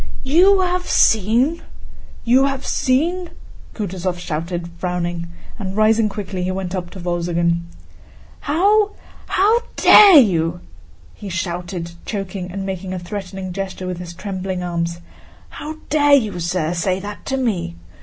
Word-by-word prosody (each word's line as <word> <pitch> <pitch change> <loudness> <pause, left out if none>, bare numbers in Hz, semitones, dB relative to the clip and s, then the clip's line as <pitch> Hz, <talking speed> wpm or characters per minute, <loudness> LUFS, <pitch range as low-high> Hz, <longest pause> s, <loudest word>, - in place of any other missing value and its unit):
"You 365 +8 +5
have 360 0 -1
seen? 235 - +3 0.6
You 255 +3 +5
have 275 -1 -2
seen?..." 335 +7 0 0.5
Kutúzov 185 -3 -3
shouted. 170 +1 -4
Frowning 175 -1 -2 0.3
and 195 -1 -5
rising 215 0 +3
quickly, 195 -2 -5
he 180 - -1
went 185 -1 -3
up 180 -2 -4
to 190 - -10
Wolzogen. 170 -1 -1 0.7
"How... 405 +7 +2 0.3
how 425 +5 +3 0.2
dare 395 -6 +8
you!..." 175 - +3 0.5
he 205 - -9
shouted, 175 -1 -4
choking 195 -3 -5
and 195 +1 -4
making 190 -1 -4
a - - -3
threatening 185 0 -6
gesture 190 -1 -5
with 180 -1 -4
his 175 -1 -8
trembling 185 -1 -4
arms: 170 -1 -2 0.5
"How 310 +1 -7 0.2
dare 290 -1 +5
you, 215 -9 0
sir, 170 -1 -1
say 185 +2 0
that 205 +1 -8
to 270 - -1
me? 205 - -1
190 Hz, 135 wpm, -20 LUFS, 175-255 Hz, 0.7 s, dare